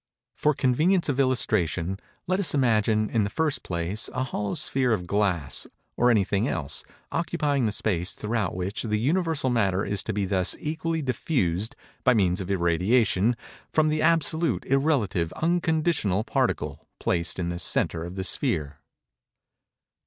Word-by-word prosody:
For 150 -1 +1
convenience 155 +9 +2
of 140 -1 0
illustration, 95 - +1 0.3
let 185 +2 0
us 185 -6 +2
imagine, 110 -4 +2
in 110 -3 +2
the 100 - -1
first 150 -2 0
place, 85 +4 -3
a 130 - 0
hollow 105 -5 -3
sphere 130 -3 +1
of 90 -5 -2
glass, 90 -7 0 0.3
or 120 - +3
of 120 - +5
anything 100 +2 +1
else, 75 - -1 0.3
occupying 150 -6 0
the - - 0
space 95 -4 0
throughout 105 -4 -2
which 95 +2 -3
the 105 -2 -1
universal 155 +1 +1
matter 100 -4 +1
is 100 -1 0
to - - -1
be 100 -1 -1
thus 95 -2 +3
equally 160 +1 -2
diffused, 110 - -1 0.3
by 130 -2 +4
means 95 -3 +2
of 95 - -6
irradiation, 95 +5 +2 0.3
from 155 -1 +3
the 155 0 0
absolute, 165 -2 +2
irrelative, 125 - +1
unconditional 160 - +1
particle, 110 - -2
placed 85 -1 0
in 90 -2 -2
the 85 0 -4
centre 85 -1 0
of 90 +2 -7
the 95 - -3
sphere. 75 -5 -1
110 Hz, 155 wpm, -26 LUFS, 95-145 Hz, 0.3 s, of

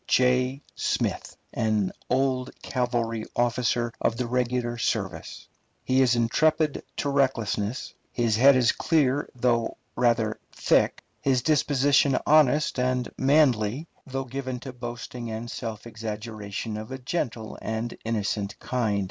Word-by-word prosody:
J. 130 +2 +2
Smith, - - -2 0.2
an 110 -4 +1 0.2
old 130 -1 +1
cavalry 120 -3 -1
officer 120 -1 +1
of 115 - +1
the 125 - -1
regular 120 -1 -1
service. - - -3 0.4
He 130 +1 +3
is 125 -2 +4
intrepid 155 +6 +2 0.2
to 145 - -1
recklessness, 125 -5 0 0.2
his 115 -3 +1
head 135 +4 +7
is 125 -2 +4
clear 145 -4 +1
though 120 -2 +1 0.2
rather 115 -3 +1
thick, - - +2 0.2
his 130 -3 +1
disposition 140 -2 +3
honest 150 -2 +4
and 125 -1 0
manly, 135 -2 +3 0.2
though 135 0 -3
given 130 0 -4
to 130 -1 -7
boasting 120 -1 -6
and 115 +2 -5
self 110 -2 -5
exaggeration 110 -1 -5
of 110 +4 -7
a 130 - -4
gentle 125 -5 -3
and 110 +2 -3
innocent 105 -2 -2
kind. 110 -5 -1
125 Hz, 125 wpm, -26 LUFS, 115-130 Hz, 0.4 s, head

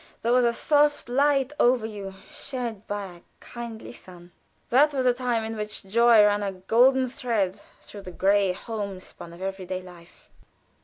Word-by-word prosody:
There 235 - +1
was 250 -1 +4
a 235 - +3
soft 290 +2 +2
light 275 +1 +2
over 240 -3 +3
you 200 -3 -7
shed 240 -6 -6
by 205 -1 -3
a 175 -2 -12 0.2
kindly 235 -2 -8
sun. 180 -5 -13 0.4
That 285 +4 +4
was 260 -1 0
a 250 - +4
time 245 -2 -1
in 225 0 -5
which 210 0 -4
joy 230 +2 +5
ran 205 0 +2
a 200 -1 -2
golden 245 +8 +3
thread 225 -7 -2 0.2
through 205 - -11
the 185 - -9
gray 195 +1 +2
homespun 200 -4 -7
of 170 +2 -10
every 190 -1 -5
day 185 0 -4
life. 175 -1 -16
220 Hz, 170 wpm, -25 LUFS, 195-245 Hz, 0.4 s, joy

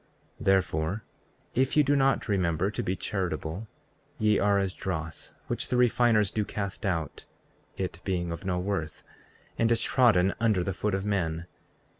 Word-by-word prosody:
34:29 - - -8
Therefore, 95 0 +1 0.5
if 130 +4 +1
ye 150 - +7
do 145 +1 +2
not 135 -4 +2
remember 95 -2 +1
to - - -3
be 90 - -1
charitable, 90 +1 -3 0.5
ye 105 -1 +3
are 100 0 +3
as 95 -2 0
dross, 80 -5 -5
which - - -2
the 125 - 0
refiners 120 -4 +4
do 105 - 0
cast 100 0 -4
out, 80 -6 -2 0.5
(it 90 -2 -4
being 85 -3 -1
of 85 - -6
no 90 -2 -1
worth) 90 -4 -3 0.6
and 115 0 +3
is 115 - +3
trodden 105 -7 +4
under 110 -6 +2
foot 105 +2 -1
of 95 +1 -3
men. 85 -5 -1
95 Hz, 160 wpm, -28 LUFS, 90-110 Hz, 0.6 s, ye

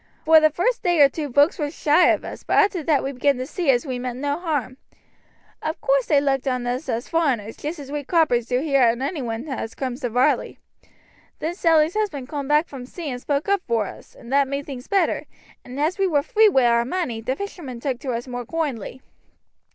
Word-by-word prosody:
"Vor 320 0 +8
the 310 0 +4
vurst 365 +11 0
day 350 -3 +1
or 285 -1 +8
two 295 +1 -5
vokes 285 +9 +3
war 295 -1 -1
shy 310 +2 +3
of - - +2
us, - - -7
but - - 0
arter 390 -4 +3
that 300 -2 +1
they 270 - -2
began 275 +1 +1
to 255 - -3
see 330 +2 -3
as 245 0 +3
we 255 -3 -3
meant 250 -1 -4
no 285 +3 -2
harm. 290 -7 -2 0.8
Of 315 +1 -3
course - - +1
they 295 -3 +4
looked 275 -1 0
on 255 -2 -1
us 255 +4 -3
as 235 0 -2
foreigners, 260 -10 0
just 310 +4 -5
as 280 -2 -9
we 295 0 -3
croppers 265 -7 +2
do 250 +1 0
here 275 -3 +2
on 240 +1 +3
anyone 260 -5 -3
as 260 -5 -5
cooms 255 0 -4
to 245 - -1
Varley. 245 +3 +1 0.8
Then 325 +2 -3
Sally's 325 -2 +3
husband 325 -12 -2
coom 285 -3 -4
back 300 +3 +3
from 255 -3 -9
sea 320 0 -6
and 245 0 -6
spoke 285 +4 -1
up 400 -1 +2
vor 230 -3 +1
us, - - -11
and 235 +3 -9
that 280 -1 +4
made 280 +1 -3
things 260 -3 -8
better, 390 -2 +1 0.4
and 255 +2 -8
as 320 +6 0
we 390 - +3
war 290 -5 +1
free 435 +6 +4
wi' 265 -10 +3
our 235 0 +3
money 255 -5 -3
the 255 +4 -2
fishermen 325 -11 -7
took 255 -1 -3
to 260 - -4
us 235 +2 -4
more 245 -1 -5
koindly. 265 -4 -4
280 Hz, 230 wpm, -23 LUFS, 250-320 Hz, 0.8 s, Vor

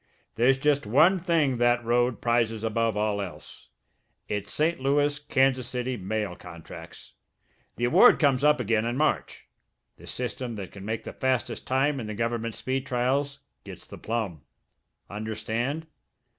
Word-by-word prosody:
There's 125 +4 +3
just 145 -3 +1
one 160 - +5
thing 160 -7 +1
that 120 0 +2
road 120 +1 +1
prizes 115 -2 +1
above 115 -1 0
all 105 -1 0
else 95 -3 -9 0.6
it's 105 -1 -3
St. 165 +3 +1
Louis 145 +2 +1
Kansas 135 -3 +1
City 125 +1 -3
mail 105 -2 -3
contracts. 85 -3 -11 0.6
The 120 - -1
award 120 - +7
comes 140 -3 +2
up 150 -1 +5
again 110 -2 +1
in 120 +2 -2
March. 155 +1 -1 0.5
The - - -14
system 125 0 -4
that 100 -3 -7
can 100 -1 -10
make 110 +1 -3
the - - -7
fastest 130 -3 -1
time 135 +2 +1
in 110 - -5
the 105 - -5
government 115 0 -2
speed 130 +4 -3
trials 140 +3 0 0.2
gets - - -10
the - - -11
plum. 110 -9 -3 0.7
Understand?" 110 +8 -3
120 Hz, 150 wpm, -27 LUFS, 110-135 Hz, 0.7 s, award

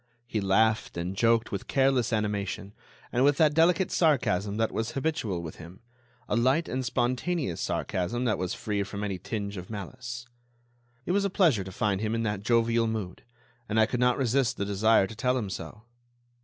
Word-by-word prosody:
He 110 -3 -2
laughed 110 +1 +2
and 90 +3 -3
joked 115 +2 +2
with 100 - -4
careless 135 -3 +2
animation, 105 -2 -2 0.4
and 125 +1 +2
with 145 0 +4
that 155 -2 +4
delicate 170 +3 +3
sarcasm 105 - +2
that 110 0 +1
was 115 +1 -3
habitual 125 - -2
with 80 - -8
him—a 120 +8 -9
light 130 +8 +2
and 130 +1 -2
spontaneous 125 - -1
sarcasm 120 +8 -2
that 110 - +1
was 90 -1 -2
quite - - -8
free 105 -2 0
from 100 +1 -4
any 100 -3 -3
tinge 100 +1 -4
of 90 0 -8
malice. 120 +3 -6 0.8
It - - -1
was 200 +2 +2
a 200 - +1
pleasure 160 - +3
to 95 - -8
find 100 +1 0
him 110 +1 -1
in 115 - -1
that 105 -3 -2
jovial 115 +1 +2
mood, 105 -5 -4 0.5
and 110 +1 +2
I 110 - +6
could 120 +2 -3
not 125 0 +3
resist 130 -1 +1
the 100 - -1
desire 105 +1 +3
to 110 - -9
tell 125 +3 +1
him 105 -6 -3
so. 105 +3 -7
115 Hz, 190 wpm, -28 LUFS, 100-125 Hz, 0.8 s, I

